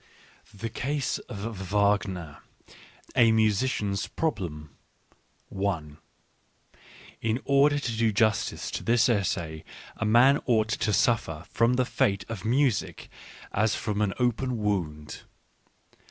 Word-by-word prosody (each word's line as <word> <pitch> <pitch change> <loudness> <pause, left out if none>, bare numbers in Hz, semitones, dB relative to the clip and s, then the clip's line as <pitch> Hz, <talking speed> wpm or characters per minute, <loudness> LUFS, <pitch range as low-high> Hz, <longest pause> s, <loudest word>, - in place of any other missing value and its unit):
"The 115 +3 -6
Case 140 +2 -2
of 105 +1 -5
Wagner: 100 -6 0 0.8
A 115 -2 +5
Musician's 105 -2 +1
Problem" 85 - -3 2.5
In 115 +2 0
order 140 +1 +4
to 140 -4 -2
do 115 0 +2
justice 110 +1 0
to - - -4
this 120 +1 +3
essay 85 -8 -1 0.3
a - - -3
man 120 +6 +5
ought 110 -3 +2
to 110 -1 0
suffer 100 -8 +1
from 115 +2 +2
the 130 0 +2
fate 100 -5 0
of 110 -5 -6
music 125 -1 0 0.4
as 110 +1 +1
from 105 -1 -2
an 100 -2 0
open 125 0 0
wound. 85 -8 -3
110 Hz, 110 wpm, -27 LUFS, 100-120 Hz, 2.5 s, A